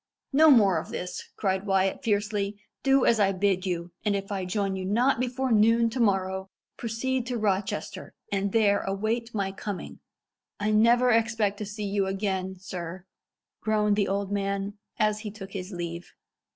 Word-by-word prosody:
"No 310 Hz, +3 st, +7 dB
more 200 Hz, -, +6 dB
of -, -, -8 dB
this!" 180 Hz, 0 st, -5 dB
cried 190 Hz, 0 st, -1 dB
Wyat 195 Hz, +2 st, +1 dB
fiercely. 205 Hz, -2 st, 0 dB, 0.2 s
"Do 270 Hz, -1 st, +4 dB
as 230 Hz, -, +4 dB
I 195 Hz, -1 st, +4 dB
bid 190 Hz, 0 st, +1 dB
you, 175 Hz, -1 st, -3 dB
and 210 Hz, -1 st, +1 dB
if 195 Hz, +1 st, -4 dB
I 190 Hz, -2 st, -2 dB
join 195 Hz, +1 st, -1 dB
you 190 Hz, -, -4 dB
not 235 Hz, +7 st, +2 dB
before 255 Hz, +1 st, -1 dB
noon 230 Hz, +1 st, +4 dB
to 255 Hz, -, -4 dB
morrow, 190 Hz, -3 st, +1 dB, 0.3 s
proceed 240 Hz, +2 st, -2 dB
to 245 Hz, -1 st, -2 dB
Rochester, 200 Hz, -2 st, -2 dB, 0.2 s
and 200 Hz, 0 st, 0 dB
there 205 Hz, -2 st, +3 dB
await 220 Hz, +4 st, -2 dB
my 195 Hz, -2 st, 0 dB
coming." 195 Hz, 0 st, -6 dB, 0.6 s
"I 210 Hz, +1 st, 0 dB
never 235 Hz, +3 st, +5 dB
expect 225 Hz, -3 st, +1 dB
to 210 Hz, -, -4 dB
see 210 Hz, 0 st, -5 dB
you 200 Hz, -1 st, 0 dB
again, 190 Hz, -1 st, -2 dB
sir!" 180 Hz, -1 st, -7 dB, 0.6 s
groaned 210 Hz, -1 st, +2 dB
the 205 Hz, -1 st, +1 dB
old 200 Hz, 0 st, -1 dB
man, 200 Hz, 0 st, -2 dB, 0.2 s
as 215 Hz, 0 st, +2 dB
he 215 Hz, -1 st, -5 dB
took 195 Hz, -2 st, -9 dB
his 190 Hz, 0 st, -6 dB
leave. 170 Hz, -1 st, -6 dB
205 Hz, 170 wpm, -27 LUFS, 190-225 Hz, 0.6 s, No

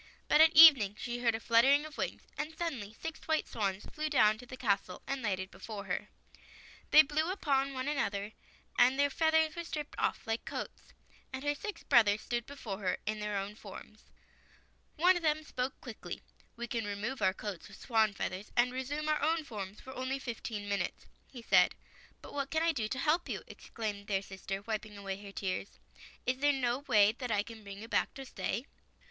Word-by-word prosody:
But 305 Hz, -, +6 dB
at 320 Hz, 0 st, +7 dB
evening 275 Hz, -11 st, +9 dB
she 240 Hz, 0 st, -3 dB
heard 235 Hz, -2 st, +2 dB
a -, -, -3 dB
fluttering 265 Hz, +6 st, +4 dB
of 310 Hz, -1 st, -9 dB
wings, -, -, -3 dB
and 320 Hz, +1 st, -5 dB
suddenly 270 Hz, -12 st, -3 dB
six 325 Hz, -1 st, -5 dB
white 315 Hz, -1 st, +1 dB
swans 200 Hz, -3 st, -2 dB
flew 310 Hz, 0 st, -3 dB
down 215 Hz, -7 st, +4 dB
to 245 Hz, -, -11 dB
the 255 Hz, -, -8 dB
castle, 195 Hz, -5 st, -1 dB
and 275 Hz, -1 st, -3 dB
lighted 190 Hz, -4 st, -2 dB
before 210 Hz, -3 st, -7 dB
her. 185 Hz, -, -3 dB, 0.8 s
They 310 Hz, -, +9 dB
blew 310 Hz, +3 st, 0 dB
upon 275 Hz, -7 st, 0 dB
one 255 Hz, +1 st, -3 dB
another, 205 Hz, -8 st, -1 dB, 0.5 s
and 255 Hz, +2 st, +6 dB
their 285 Hz, 0 st, +3 dB
feathers 320 Hz, 0 st, +3 dB
were 340 Hz, -, -4 dB
stripped 300 Hz, -3 st, -5 dB
off -, -, 0 dB
like 225 Hz, 0 st, -2 dB
coats, -, -, -7 dB, 0.4 s
and 265 Hz, +1 st, -5 dB
her 290 Hz, 0 st, +1 dB
six 420 Hz, +8 st, -6 dB
brothers 215 Hz, -5 st, +5 dB
stood 240 Hz, -1 st, -3 dB
before 230 Hz, -8 st, -6 dB
her 190 Hz, -3 st, 0 dB
in 215 Hz, 0 st, -2 dB
their 210 Hz, -1 st, -2 dB
own 195 Hz, +1 st, -3 dB
forms. 215 Hz, 0 st, -11 dB, 1.0 s
One 360 Hz, +4 st, +5 dB
of 350 Hz, -, -2 dB
them 310 Hz, -1 st, +1 dB
spoke 255 Hz, -3 st, -3 dB
quickly. -, -, -7 dB, 0.3 s
"We 235 Hz, -, -4 dB
can 230 Hz, -2 st, -2 dB
remove 205 Hz, +6 st, -3 dB
our 190 Hz, -, +4 dB
coats 205 Hz, -2 st, -6 dB
of 195 Hz, -, -12 dB
swan's 220 Hz, -3 st, +1 dB
feathers 190 Hz, +3 st, -4 dB
and 245 Hz, +1 st, +4 dB
resume 285 Hz, +4 st, -3 dB
our 305 Hz, 0 st, +1 dB
own 320 Hz, +2 st, +2 dB
forms 205 Hz, -6 st, -7 dB
for 260 Hz, -, -9 dB
only 260 Hz, +1 st, -2 dB
fifteen 225 Hz, -5 st, -5 dB
min 200 Hz, 0 st, 0 dB
utes," -, -, -5 dB, 0.2 s
he 245 Hz, -3 st, -11 dB
said. -, -, +5 dB, 0.2 s
" -, -, -26 dB
But -, -, -10 dB
what 280 Hz, -1 st, -2 dB
can 320 Hz, 0 st, +1 dB
I 335 Hz, -, +4 dB
do 230 Hz, -8 st, -2 dB
to 260 Hz, -, -3 dB
help 320 Hz, +5 st, +1 dB
you," -, -, -3 dB
ex -, -, -13 dB
claimed 210 Hz, -2 st, -4 dB
their 195 Hz, -1 st, 0 dB
sister, 195 Hz, 0 st, -6 dB
wiping 215 Hz, -1 st, -4 dB
away 195 Hz, 0 st, -5 dB
her 200 Hz, -1 st, -9 dB
tears. 195 Hz, 0 st, -4 dB, 0.2 s
" -, -, -19 dB
Is 255 Hz, +1 st, +1 dB
there 290 Hz, +1 st, +4 dB
no 250 Hz, -2 st, 0 dB
way 210 Hz, -4 st, +6 dB
that 250 Hz, +2 st, -6 dB
I 205 Hz, -2 st, +2 dB
can 225 Hz, -1 st, -11 dB
bring 200 Hz, -1 st, -8 dB
you -, -, -8 dB
back -, -, 0 dB
to 270 Hz, 0 st, -7 dB
stay? 245 Hz, -1 st, -3 dB
240 Hz, 210 wpm, -32 LUFS, 205-290 Hz, 1.0 s, evening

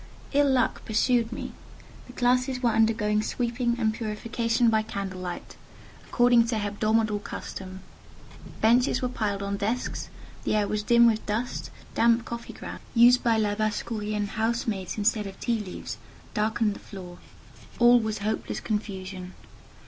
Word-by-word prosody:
Ill 285 Hz, 0 st, +4 dB
luck 260 Hz, -2 st, +1 dB
pursued 230 Hz, +1 st, +2 dB
me. -, -, -5 dB, 0.6 s
The 250 Hz, -, -12 dB
classes 250 Hz, +1 st, +1 dB
were 235 Hz, -, +4 dB
undergoing 220 Hz, -1 st, +2 dB
sweeping 235 Hz, +1 st, -1 dB
and 220 Hz, -2 st, +2 dB
purification 230 Hz, +2 st, 0 dB
by 220 Hz, -1 st, +3 dB
candle 195 Hz, -4 st, -5 dB
light, 180 Hz, -1 st, -6 dB, 0.5 s
according 240 Hz, -1 st, +4 dB
to 230 Hz, -, -1 dB
hebdomadal 215 Hz, +1 st, +1 dB
custom: 190 Hz, 0 st, -7 dB, 0.8 s
benches 245 Hz, +4 st, +3 dB
were 250 Hz, -, +1 dB
piled 205 Hz, -5 st, -2 dB
on 200 Hz, 0 st, -2 dB
desks, 225 Hz, +5 st, -2 dB, 0.3 s
the -, -, 0 dB
air 210 Hz, -1 st, +2 dB
was 210 Hz, 0 st, -1 dB
dim 235 Hz, +2 st, +5 dB
with 220 Hz, -2 st, +3 dB
dust, 225 Hz, +4 st, -2 dB, 0.2 s
damp 230 Hz, 0 st, +3 dB
coffee 235 Hz, 0 st, -6 dB
grounds -, -, -8 dB
(used 240 Hz, +2 st, +6 dB
by 230 Hz, -2 st, +3 dB
Labassecourien 210 Hz, 0 st, -1 dB
housemaids 220 Hz, -3 st, -2 dB
instead 210 Hz, 0 st, +1 dB
of 195 Hz, 0 st, -10 dB
tea 230 Hz, -2 st, 0 dB
leaves) 195 Hz, -4 st, -6 dB, 0.3 s
darkened 215 Hz, 0 st, +1 dB
the -, -, -10 dB
floor; 180 Hz, -3 st, -10 dB, 0.6 s
all 240 Hz, 0 st, +7 dB
was 220 Hz, -1 st, -2 dB
hopeless 215 Hz, +2 st, -2 dB
confusion. 190 Hz, -3 st, -4 dB
220 Hz, 140 wpm, -27 LUFS, 210-235 Hz, 0.8 s, all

